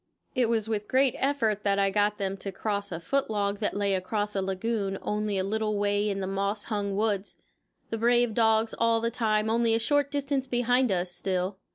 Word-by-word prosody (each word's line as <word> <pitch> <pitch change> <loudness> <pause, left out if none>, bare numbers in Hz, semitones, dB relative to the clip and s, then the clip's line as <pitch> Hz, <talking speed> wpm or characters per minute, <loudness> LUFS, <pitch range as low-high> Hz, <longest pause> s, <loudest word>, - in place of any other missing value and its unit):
It 250 -4 +2
was 225 -2 +1
with 210 -2 -2
great 260 0 +3
effort 245 -7 +1
that 200 -1 +2
I 195 0 +2
got 205 +1 +1
them 195 -1 -2
to 195 +1 -6
cross 200 0 -3
a 165 - -4
foot 275 +11 -1
log 200 -1 -1
that 210 - -1
lay 200 -1 +1
across 205 +3 -2
a 195 - +1
lagoon 195 +1 -2
only 210 -1 -1
a 190 - +1
little 215 +1 -1
way 205 +1 +1
in 195 -1 -2
the - - -2
moss 200 +2 -2
hung 205 -3 -2
woods, 205 -1 -1 0.5
the 225 - -2
brave 240 0 +3
dogs 220 0 +2
all 230 0 +3
the 230 +1 -1
time 215 -2 +1
only 230 0 +2
a - - +1
short 285 +4 +1
distance 280 -2 -1
behind 245 -1 +2
us 180 -1 -1
still. 185 +1 -2
210 Hz, 210 wpm, -27 LUFS, 200-230 Hz, 0.5 s, great